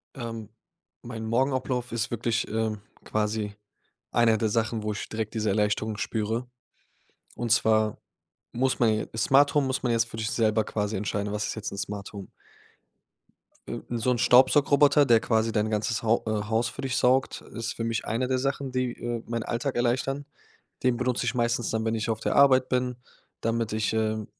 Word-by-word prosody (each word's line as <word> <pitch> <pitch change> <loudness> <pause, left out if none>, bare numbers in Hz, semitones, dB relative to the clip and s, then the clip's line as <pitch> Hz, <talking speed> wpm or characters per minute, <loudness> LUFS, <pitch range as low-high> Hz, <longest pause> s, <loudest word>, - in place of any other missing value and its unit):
Ähm, 115 -4 -6 0.5
mein 115 -2 -6
Morgenablauf 125 +1 0
ist 115 -2 -1
wirklich, 115 0 -1
ähm, 110 -1 -1 0.2
quasi 105 -1 -1 0.6
einer 115 -2 +4
der 110 - +1
Sachen, 110 0 0
wo 105 0 -2
ich 105 - -5
direkt 110 0 -4
diese 110 -1 0
Erleichterung 105 +1 0
spüre. 110 +3 -2 0.9
Und 120 -1 -3
zwar 110 -2 +2 0.5
muss 130 +2 0
man 115 - +4
j 110 - -3
Smarthome 140 +4 +4
muss 130 0 -2
man 125 - +1
jetzt 115 -1 +2
für 110 - -9
sich 110 -1 -2
selber 110 -1 +2
quasi 105 0 -2
entscheiden, 100 0 -2
was 105 0 -2
ist - - -4
jetzt 110 -2 -5
'n 100 - -7
Smarthome? 100 0 -6 1.6
So 120 +1 0
'n 125 - +1
Staubsaugroboter, 140 +4 +5
der 120 -4 +5
quasi 110 0 +1
dein 110 0 0
ganzes 110 0 -1
Hau 115 +1 +2
äh, 110 -1 -1
Haus 115 +1 +1
für 115 - -8
dich 130 -2 -1
saugt, 130 +1 +2
ist 115 0 -4
für 115 - -4
mich 115 0 -2
einer 115 +4 0
der 130 0 0
Sachen, 135 0 -2
die, 130 -1 0
äh, 120 -1 -4
meinen 115 -1 -3
Alltag 125 +5 -2
erleichtern. 130 +4 0 0.6
Den 125 -2 +2
benutze 125 0 -1
ich - - -1
meistens 120 -1 0
dann, 110 0 -1
wenn 110 0 0
ich 110 0 -2
auf 110 -1 -1
der - - -1
Arbeit 130 -2 +6
bin, 125 -1 0 0.4
damit 115 -1 -1
ich, 110 0 0
äh, 110 -1 0
115 Hz, 180 wpm, -27 LUFS, 110-125 Hz, 1.6 s, Arbeit